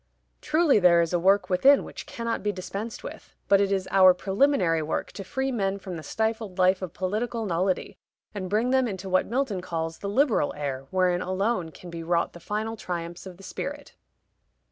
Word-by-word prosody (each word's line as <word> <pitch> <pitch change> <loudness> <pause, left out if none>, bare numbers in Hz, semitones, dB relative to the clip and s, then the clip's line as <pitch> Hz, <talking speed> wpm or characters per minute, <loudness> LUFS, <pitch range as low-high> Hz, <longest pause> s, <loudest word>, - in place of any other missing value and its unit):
"Truly 310 -7 +3
there 175 -2 +6
is 170 +1 -1
a 175 - +2
work 190 +1 +3
within 265 +11 +5
which - - -9
cannot 230 -1 -3
be 210 - 0
dispensed 200 +4 -6
with; - - -10
but 200 0 +5
it 200 -1 +1
is 190 -1 0
our 185 -1 +7
preliminary 190 - +2
work 155 - -3
to 195 - -7
free 265 +7 -2
men 195 -5 -1
from 190 -2 -7
the 160 - -6
stifled 220 +1 -2
life 185 +1 +3
of 185 -3 -6
political 220 +5 -2
nullity, 185 0 -1 0.3
and 190 -3 -5
bring 220 +5 +1
them 260 -1 +3
into 190 -3 -5
what 185 0 +2
Milton 235 -6 -1
calls 165 -2 -4
'the 200 - -4
liberal 235 - +2
air,' 135 -2 -4
wherein 180 -1 +1
alone 185 -1 -1
can 175 +2 -12
be 170 0 -6
wrought 170 +1 0
the 175 - -11
final 215 +5 -3
triumphs 175 -3 -6
of 180 -2 -10
the 195 - -15
Spirit." - - -6
190 Hz, 195 wpm, -26 LUFS, 180-220 Hz, 0.3 s, our